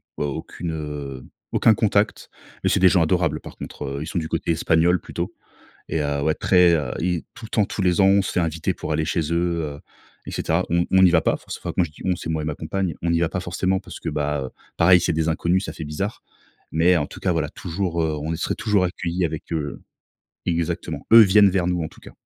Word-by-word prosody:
vois 75 - -2
aucune, 80 +4 -5
heu, 75 -4 -6 0.3
aucun 110 - +5
contact 105 0 0 0.3
mais - - +2
c'est - - +2
des 95 - +6
gens 90 -1 +3
adorables, 80 -2 +1
par - - -11
contre, - - -7
heu, 70 +2 -4
ils - - -7
sont 85 - -2
du 80 - -4
côté 85 +1 -1
espagnol 85 +2 +3
plutôt - - -5 0.6
et 80 - -1
heu, 70 -1 -1
ouais, 80 +1 +2
très, 90 -2 +4
heu 75 - -1
et 90 -1 -1
tout 115 - -11
le 110 - -9
temps, 105 - +2
tous 100 - -4
les 90 0 +2
ans, 95 - +6
on 100 0 +5
se - - -4
fait - - +1
inviter 80 -1 -1
pour - - -6
aller 80 0 0
chez 80 +2 0
eux, 85 -1 0
heu - - -11 0.5
et - - -5
cetera. 85 +3 0
On 85 +1 +2
on 95 0 +5
n'y 90 - +7
va 85 -2 +4
pas, - - +2
enfin, - - -9
c'est - - -7
moi 90 - +1
je 80 - -7
dis: 75 - -14
«On», 95 - +2
c'est 80 - -7
moi 80 -1 -1
et - - -4
ma 75 -1 -2
compagne, 90 +2 -2
on 85 - 0
n'y 85 0 +2
va 85 - +2
pas 90 - -2
forcément 95 +2 -1
parce 90 -4 -10
que, 80 - -4
bah, 75 -1 -1
heu, - - -10 0.3
pareil, 90 +2 +6
c'est 85 - 0
des 80 0 0
inconnus, 85 +4 +1
ça - - -5
fait 80 - -7
bizarre 75 +8 -4 0.5
mais 85 +3 +4
en 75 - 0
tout - - -11
cas, - - 0
voilà, - - -1
toujours, 85 -1 -3
heu, 80 -1 0
on 80 - -2
y 80 - -2
serait - - -1
toujours 100 -3 +1
accueilli 90 0 -2
avec, 80 -2 -4
heu 75 -3 -3 0.6
exactement. 85 0 -2
Eux 115 - +11
viennent 100 -1 +6
vers 90 -2 0
nous, 90 -1 0
en 80 - -3
tout - - -18
cas. - - -13
85 Hz, 260 wpm, -23 LUFS, 80-90 Hz, 0.6 s, Eux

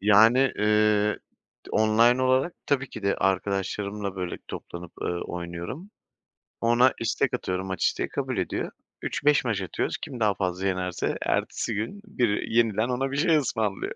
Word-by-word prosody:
G 100 - -7
Yani, 115 +6 +6
eee, 105 0 +3 0.5
d - - -10
online 115 +4 +4
olarak 130 +6 +2
tabii 135 -2 +1
ki 110 - -8
de 100 0 +1
arkadaşlarımla, 100 +1 -1
böyle, 90 -2 -4
toplanıp, 85 -1 -8
eee, - - -1
oynuyorum. 85 - -5 0.7
Ona 120 +2 +4
istek 125 +3 0
atıyorum 95 -6 -2
maç 95 - -1
isteği, - - 0
kabul - - -3
ediyor. - - -2 0.3
3-5 145 -2 +2
maç 105 -5 0
atıyoruz. 95 - -2
Kim 130 -4 -7
daha 105 -2 +3
fazla 95 0 -2
yenerse 90 -1 -1
ertesi - - -1
gün 115 - -4
biri 120 - -1
yeniden 115 0 +2
ona 130 +2 -1
bir 140 - -2
şey 160 +1 +4
ısmarlıyor. 110 -8 -1
110 Hz, 155 wpm, -26 LUFS, 95-125 Hz, 0.7 s, Yani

